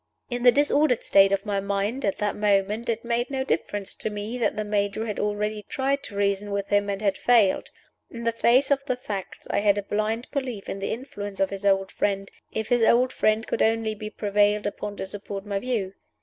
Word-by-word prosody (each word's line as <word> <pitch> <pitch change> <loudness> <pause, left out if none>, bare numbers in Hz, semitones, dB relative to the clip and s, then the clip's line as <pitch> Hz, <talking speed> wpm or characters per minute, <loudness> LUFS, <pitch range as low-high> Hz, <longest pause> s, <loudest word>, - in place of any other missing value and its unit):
In 245 0 -2
the 245 0 +7
dis 290 +3 +2
ordered 285 -5 +3
state 195 0 +5
of 195 +1 0
my 200 -2 0
mind 200 +6 -2
at 200 - 0
that 210 -1 -1
moment, 210 +2 +1
it 230 0 -2
made 235 +1 0
no 265 -1 -1
difference 205 -6 -2
to - - -3
me 210 +3 -5
that 235 - +1
the 215 - -1
Major 205 +1 -1
had 210 -2 -4
already 210 +1 -1
tried 275 +1 0
to 205 - -8
reason 200 0 0
with 200 0 -2
him, 205 0 +2
and 200 +1 -3
had 195 -2 +1
failed. 225 -6 +3 0.4
In 235 -1 -8
the 230 - +2
face 245 +4 +3
of 275 -1 +2
the 255 -3 0
facts 205 -6 -6
I - - +2
had 205 0 +3
a 205 - -1
blind 215 +4 -1
belief 255 -8 -4
in 195 - -4
the 195 - -3
influence 205 -5 -6
of 195 - +1
his 200 0 -2
old 195 0 +2
friend, 195 -1 -1 0.2
if 220 0 -3
his 245 -1 +3
old 245 +3 +4
friend 215 +1 +2
could - - -2
only 225 -1 +2
be 215 0 -6
prevailed 205 0 +1
upon 205 0 -4
to - - -3
support 200 0 -7
my 200 -1 -2
view. 210 -5 -2
210 Hz, 225 wpm, -25 LUFS, 200-235 Hz, 0.4 s, the